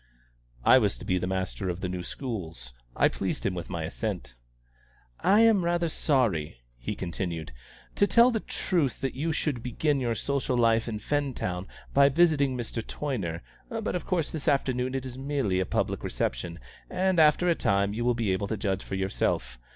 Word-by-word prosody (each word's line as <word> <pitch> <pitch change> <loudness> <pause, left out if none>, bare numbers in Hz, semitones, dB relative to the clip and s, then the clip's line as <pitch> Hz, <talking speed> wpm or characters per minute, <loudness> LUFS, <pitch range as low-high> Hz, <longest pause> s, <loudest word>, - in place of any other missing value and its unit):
I 130 - +7
was 105 -5 +1
to - - -9
be 90 0 +1
the 90 - -2
master 95 0 -2
of 90 +1 -4
the 95 - -1
new 90 0 -3
schools. 85 - -6 0.2
I - - +5
pleased - - -3
him 95 - +1
with 85 -2 -6
my 85 -2 -3
assent. 85 - -4 0.9
"I 205 +3 +5
am 225 -5 +5
rather 170 0 +1
sorry," 105 - 0 0.2
he - - -4
continued, 85 -4 -4 0.4
"to 200 - +3
tell 235 +4 +6
the 225 - 0
truth, 165 - -1
that 135 -1 -1
you 155 +5 -1
should 150 -6 -1
begin 140 +4 0
your 120 -3 0
social 130 +1 -1
life 115 -1 +3
in 110 -2 -2
Fentown 110 -9 -2 0.3
by 140 0 +6
visiting 145 -4 +3
Mr. 115 -1 -3
Toyner; 100 - -4 0.3
but 225 -2 -2
of 180 - -3
course 175 -5 0
this 160 -1 -5
afternoon 130 -3 +1
it 135 -1 -2
is 130 0 -7
merely 135 -9 0
a 95 - 0
public - - -1
reception, 85 -1 -2 0.3
and 185 -1 +1
after 155 +3 +5
a 175 - +5
time 100 -8 +1
you 115 +2 -2
will 120 0 +2
be 110 -5 +1
able 100 +2 -1
to 110 - -2
judge 95 -1 -1
for - - -5
yourself. 65 -10 -1
120 Hz, 190 wpm, -28 LUFS, 95-145 Hz, 0.9 s, I